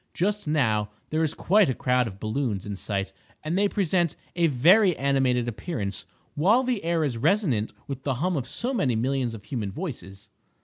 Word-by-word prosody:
Just 205 +1 -1
now 110 -9 +1 0.2
there 155 +1 +1
is 155 - 0
quite 200 -1 +3
a 130 - 0
crowd 125 -1 +1
of 95 -2 -9
balloons 110 -2 -2
in 105 -1 -4
sight, 95 -1 -3 0.3
and 155 +3 -2
they 200 +1 +3
present 175 -5 +1 0.2
a 170 -1 +3
very 175 - +5
animated 130 -3 +1
appearance, 110 - -4 0.3
while 205 - +3
the 245 -5 -1
air 165 -1 +1
is 125 -6 -2
resonant 145 - +1
with 140 -2 -6
the 135 -1 -1
hum 175 +8 0
of 130 -4 -2
so 245 - -2
many 140 - +1
millions 125 0 -1
of 105 - -11
human 105 -4 -4
voices. 100 - -7
140 Hz, 185 wpm, -26 LUFS, 115-175 Hz, 0.3 s, very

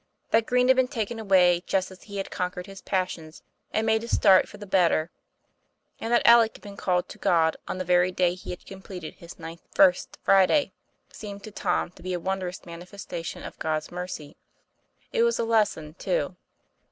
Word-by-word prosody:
That 225 0 +3
Green 250 0 +3
had 260 - +6
been 260 -1 +4
taken 235 -3 -3
away 180 -4 +4
just 190 0 0
as 190 - -13
he 200 -1 -9
had 195 - -4
conquered 180 0 -3
his 195 0 -11
passions 180 -4 -3 0.3
and 220 - 0
made 220 0 +2
a - - -6
start 195 -5 +5
for - - -11
the 205 - -9
better, 175 -4 +2 0.9
and 225 - -4
that 240 - +3
Alec 235 -1 +6
had - - -25
been 200 -1 -9
called 180 -2 0
to - - -11
God 165 -2 +3
on - - -3
the 185 - -3
very 180 +1 +3
day 180 -1 +2
he 185 - -10
had 180 - -7
completed 190 -3 -9
his 170 +1 -12
ninth 165 +1 -9
First 185 -2 +4
Friday, 195 +10 +4 0.4
seemed 200 -2 -8
to 215 - -9
Tom 195 - -1
to 180 - -18
be 185 +1 -4
a 175 - -1
wondrous 185 0 -3
manifestation 175 0 -7
of - - -9
God's 155 -1 -2
mercy. 175 -4 -6 0.8
It 465 - +2
was 470 0 +3
a - - 0
lesson, 210 -9 +1
too. - - -2
185 Hz, 195 wpm, -26 LUFS, 175-215 Hz, 0.9 s, had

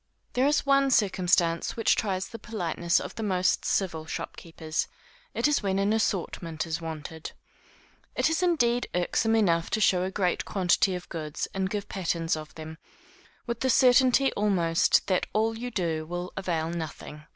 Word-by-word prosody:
There 255 +2 +2
is 295 0 +2
one 275 0 +4
circumstance 180 -7 +2
which 225 - +3
tries 190 -3 -2
the 230 - -9
politeness 175 -6 -1
of - - -7
the - - -6
most 185 -3 +1
civil 165 -5 -1
shopkeepers; 160 -1 -4 0.5
it - - +2
is 295 - +2
when 195 -2 0
an 200 +2 +2
assortment 170 -6 -2
is 165 0 -3
wanted. 160 0 -7 0.8
It - - +2
is 320 +2 0
indeed 245 -9 +2
irksome 220 +5 +1
enough 170 -6 +2
to - - 0
show 185 -4 +3
a 185 - -1
great 185 -2 0
quantity 185 -1 +2
of 180 0 -7
goods, 155 -3 -4
and 190 -1 -1
give 205 0 -4
patterns 170 -3 -1
of 155 -1 -9
them, 160 0 -9 0.7
with 235 -1 -3
the 260 - 0
certainty 255 +1 +5
almost 180 -5 +2
that 185 -2 0
all 225 +1 +1
you 245 +2 -5
do 165 -8 -2
will 175 +1 -5
avail 165 -4 -2
nothing. 155 -2 -7
185 Hz, 165 wpm, -27 LUFS, 165-225 Hz, 0.8 s, certainty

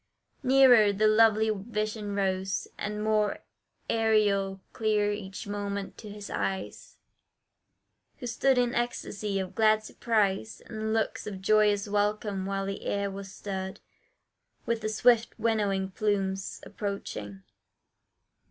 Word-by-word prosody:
Nearer 255 -5 +6
the 205 +2 +1
lovely 220 0 +5
vision 210 0 -3
rose, 190 -1 -1
and 210 0 -4
more 215 -1 +2 0.5
Aerial 205 -4 +2
clear 210 -2 +1
each 195 -2 -6
moment 200 -1 -4
to 215 - -9
his 205 0 -8
eyes, 190 -1 -4 1.2
Who 255 - -8
stood 255 +3 +2
in 245 -1 +2
ecstacy 210 -4 -2
of 190 -1 -3
glad 215 -1 +3
surprise, 215 -1 0
And 220 -1 -4
looks 220 -1 -1
of 200 -3 -5
joyous 210 0 +3
welcome, 205 -1 0
while 195 0 -2
the 195 0 -5
air 200 0 -1
was 195 0 -7
stirred 190 -1 -5 0.9
With 230 -1 -1
the 215 - -1
swift 230 +2 +3
winnowing 200 -4 0
plumes 195 -2 -1
approaching. 105 - -5
210 Hz, 120 wpm, -28 LUFS, 195-220 Hz, 1.2 s, Nearer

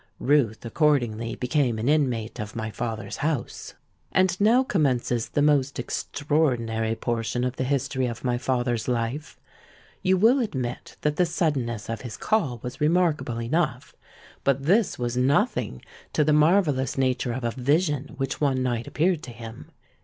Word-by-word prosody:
Ruth 125 -6 +1
accordingly 120 -4 +1
became 125 -3 0
an 110 +3 -2
inmate 125 -7 +1
of 105 0 -6
my 110 -1 -3
father's 110 -3 -4
house. 145 -4 -3 0.4
"And 185 -1 +3
now 235 +5 +5
commences 130 - 0
the 145 - +1
most 140 -2 +2
extraordinary 120 -5 -1
portion 115 +1 -2
of 125 0 -2
the - - 0
history 135 -1 0
of 120 -1 -6
my 120 -1 0
father's 120 -3 -1
life. 125 +4 -2 0.6
You 185 0 +3
will 230 +8 +5
admit 130 - -4
that 150 0 0
the 180 - +3
suddenness 130 - -1
of 115 0 -4
his 120 -4 -7
'call' 150 - 0
was 125 +2 -7
remarkable 155 -7 +1
enough; 125 +1 -1 0.5
but 140 0 +1
this 195 +8 +2
was 120 -1 -2
nothing 125 - +1 0.3
to 150 - +3
the 150 +1 +3
marvellous 150 - +3
nature 130 -2 0
of 130 +1 -4
a 120 - 0
vision 145 +3 0
which 135 +1 -3
one 135 -3 +2
night 120 -2 -1
appeared 170 0 +1
to 130 - -8
him. 115 -1 -10
130 Hz, 155 wpm, -25 LUFS, 120-150 Hz, 0.6 s, now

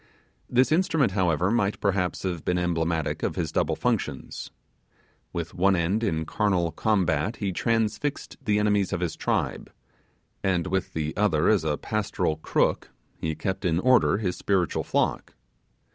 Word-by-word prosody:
This 125 +3 +3
instrument, 160 - +2
however, 90 -1 +1
might 105 -3 +1
perhaps 95 -3 0
have 90 -4 -3
been 90 - 0
emblematic 85 -2 -1
of - - -1
his - - -2
double - - +1
functions. - - -2 0.8
With 85 0 -4
one 95 +2 +3
end 90 +6 0
in 80 -7 0
carnal 90 -4 +1
combat 95 0 +1
he 100 -2 -2
transfixed 115 +7 -1
the 105 -4 +2
enemies 105 -2 +2
of 90 - -1
his 85 -3 -2
tribe; - - -2 0.7
and 90 -3 +1
with 95 0 -2
the 80 -1 -2
other 90 -7 +2
as 105 -6 +3
a 75 -2 0
pastoral 105 -7 -1
crook 80 - 0 0.3
he 80 -1 -3
kept 95 +2 -3
in 85 -2 +1
order 125 -2 +4
his 95 -4 -2
spiritual 95 -5 0
flock. - - -1
95 Hz, 150 wpm, -26 LUFS, 85-105 Hz, 0.8 s, order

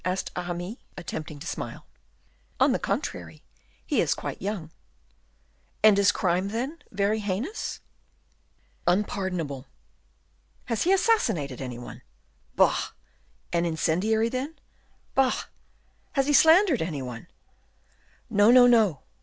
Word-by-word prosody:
asked 185 +1 -2
Aramis, 180 +4 -4 0.2
attempting 155 -4 -6
to 140 - -10
smile. - - -6 0.7
"On - - +5
the - - +1
contrary, 80 -3 -4 0.4
he - - +1
is - - +1
quite - - -6
young." 190 -5 -4 1.1
"Is 215 -1 +8
his 200 0 +4
crime, 185 -1 0
then, 255 +10 -3
very 205 +2 0
heinous?" 210 - -3 1.1
"Unpardonable." 175 -7 -1 1.0
"Has 230 -3 -2
he 365 - +3
assassinated 225 - +1
any 125 -2 -5
one?" 120 - -10 0.5
"Bah!" - - +2 0.6
"An 170 0 +2
incendiary, 180 +7 +1
then?" 265 +6 -4 0.6
"Bah!" 265 -2 +2 0.7
"Has 275 -2 +2
he 290 - +1
slandered 320 - +6
any 155 -5 -3
one?" 120 -2 -8 1.0
"No, 205 +2 +4
no! 235 - +6
200 Hz, 110 wpm, -26 LUFS, 165-245 Hz, 1.1 s, Is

